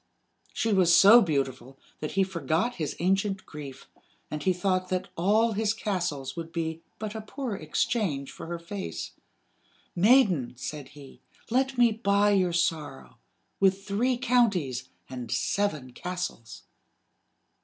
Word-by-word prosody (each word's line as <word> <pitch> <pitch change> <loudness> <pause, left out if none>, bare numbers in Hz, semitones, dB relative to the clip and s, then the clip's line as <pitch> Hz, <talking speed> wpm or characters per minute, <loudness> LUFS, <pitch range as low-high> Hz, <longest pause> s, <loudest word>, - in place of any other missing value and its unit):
She 225 -1 0
was 185 -3 +4
so 200 +8 +8
beautiful 135 - -2 0.2
that 150 - -4
he 195 - +3
forgot 185 +5 -1
his 155 -4 -3
ancient 195 +2 0
grief, 145 -3 -9 0.4
and 150 - -4
he 185 - +2
thought 185 0 0
that 185 +1 -2
all 215 +6 +3
his 215 +1 0
castles 175 - -3
would 165 -1 -6
be 160 -1 -3 0.2
but 215 -1 -5
a 220 - -5
poor 245 +2 -5
exchange 155 - -1
for - - -9
her 170 0 -4
face. 190 +4 -6 0.8
"Maiden," 185 - +4
said 140 +1 -6
he, 140 -2 -13 0.3
"let 265 +1 +1
me 240 -1 +5
buy 205 -2 +2
your 185 -3 +2
sorrow 155 - -2 0.4
with 195 0 +2
three 240 +5 +1
counties 200 - +1 0.2
and 125 -2 -7
seven 155 -11 -1
castles." 180 -9 -6
185 Hz, 135 wpm, -27 LUFS, 150-205 Hz, 0.8 s, so